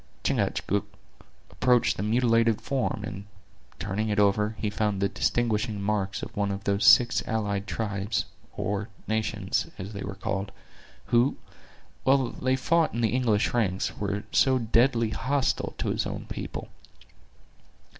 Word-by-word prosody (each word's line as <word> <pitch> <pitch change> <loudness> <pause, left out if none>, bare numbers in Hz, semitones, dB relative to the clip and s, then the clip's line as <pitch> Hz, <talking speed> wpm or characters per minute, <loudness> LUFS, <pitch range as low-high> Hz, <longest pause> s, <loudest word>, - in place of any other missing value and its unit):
Chingachgook 100 +1 0 0.6
approached 125 -2 +3
the - - -4
mutilated 115 0 +3
form, 130 -6 -2
and, 100 -2 -7 0.5
turning 105 +3 -2
it 105 - 0
over, 105 +1 +3
he 105 - -2
found 105 -1 0
the 100 - +2
distinguishing 105 +1 0
marks 100 -2 -1
of - - -7
one 100 -1 0
of 100 0 -4
those 100 0 +1
six 125 0 +6
allied 105 -2 -1
tribes, 100 -1 -2 0.3
or 100 +1 -2 0.2
nations, 110 -3 -1
as 95 +4 -7
they 100 - -6
were 100 0 -5
called, 100 0 -3 0.6
who, 120 +3 +4 0.7
while 130 -2 +3
they 130 +1 0
fought 160 +3 +1
in 120 - -1
the 115 - +3
English 120 -4 +1
ranks, 100 -6 0
were 100 0 -2
so 130 -1 +4
deadly 115 -1 +2
hostile 135 +3 0
to - - -2
his - - -1
own - - -5
people. - - -6
105 Hz, 145 wpm, -27 LUFS, 100-120 Hz, 0.7 s, six